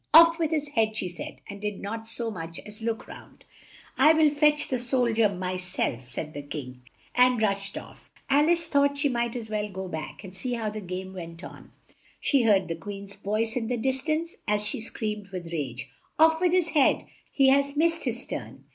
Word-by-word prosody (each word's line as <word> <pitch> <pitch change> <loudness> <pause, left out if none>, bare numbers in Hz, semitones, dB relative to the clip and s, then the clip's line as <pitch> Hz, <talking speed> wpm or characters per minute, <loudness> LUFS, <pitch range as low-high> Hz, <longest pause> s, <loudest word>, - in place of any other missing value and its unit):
"Off 335 +1 +9
with 320 -2 +1
his 300 -2 -1
head," 220 -5 +1
she 185 - -1
said, 175 -1 -7
and 200 0 -8
did 210 -1 -3
not 225 +2 -5
so 230 0 -3
much 165 -3 -6
as 210 +1 -10
look 225 0 -3
round. - - -13 0.5
"I'll 310 +2 +6
fetch 300 0 +3
the 255 - -1
sol 245 -1 +1
dier 220 -1 +4
my 185 -1 -3
self," 175 -9 -3
said 155 +4 -5
the 145 - -5
King, 130 -3 -7 0.3
and 250 -1 +4
rushed 200 -2 -1
off. - - -11 0.2
Al 290 +3 +4
ice 340 -1 +3
thought 285 -2 +2
she 285 0 +2
might 235 -1 -1
as 225 -3 -6
well 210 -1 -1
go 190 -1 -6
back, 160 +3 -6
and 190 -1 -10
see 245 +5 -3
how 225 -3 -2
the 215 0 -6
game 185 0 -6
went 170 -2 -8
on. - - -11 0.5
She 275 -3 +3
heard 205 -5 +4
the 165 - -2
Queen's 200 +3 -8
voice 215 +3 -1
in 235 -3 -1
the 245 +1 -1
dis 265 +3 +1
tance, 320 +3 -2
as 210 0 +1
she 210 - 0
screamed 215 -2 -3
with 180 -3 -7
rage, 130 -4 -4 0.3
"Off 320 +1 +5
with 360 -2 +3
his 360 -2 +3
head! 290 -5 +3 0.3
He 270 -2 +4
has 280 +1 +3
missed 330 0 +3
his 240 -1 +2
turn!" - - -6
225 Hz, 210 wpm, -27 LUFS, 190-280 Hz, 0.5 s, Off